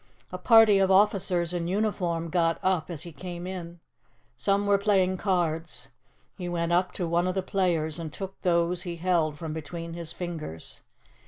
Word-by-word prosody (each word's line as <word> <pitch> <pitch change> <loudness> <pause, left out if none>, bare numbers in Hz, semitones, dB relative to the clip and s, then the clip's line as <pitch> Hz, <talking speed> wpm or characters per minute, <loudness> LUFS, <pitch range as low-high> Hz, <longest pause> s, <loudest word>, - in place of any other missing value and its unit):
A 180 - -5
party 220 0 +6
of 190 -1 +3
officers 190 -3 +3
in 170 -1 -2
uniform 180 -4 -1
got 165 -1 +1
up 185 -3 +1
as 165 -3 -4
he 170 - -8
came 175 +3 -7
in. 175 -2 -7 0.6
Some 195 +11 +1
were 200 -1 +3
playing 190 -2 +2
cards. 165 -8 -1 0.5
He 180 -1 -4
went 170 -1 -1
up 180 +1 +2
to 175 - -2
one 170 +2 +1
of 185 - -1
the 190 - 0
players 175 -5 0
and 160 -2 -5
took 195 +4 -7
those 175 0 +1
he 175 -1 -4
held 165 -3 0
from 160 -1 -5
between 165 +2 -6
his 170 -1 -5
fingers. 160 - -6
175 Hz, 175 wpm, -27 LUFS, 165-185 Hz, 0.6 s, party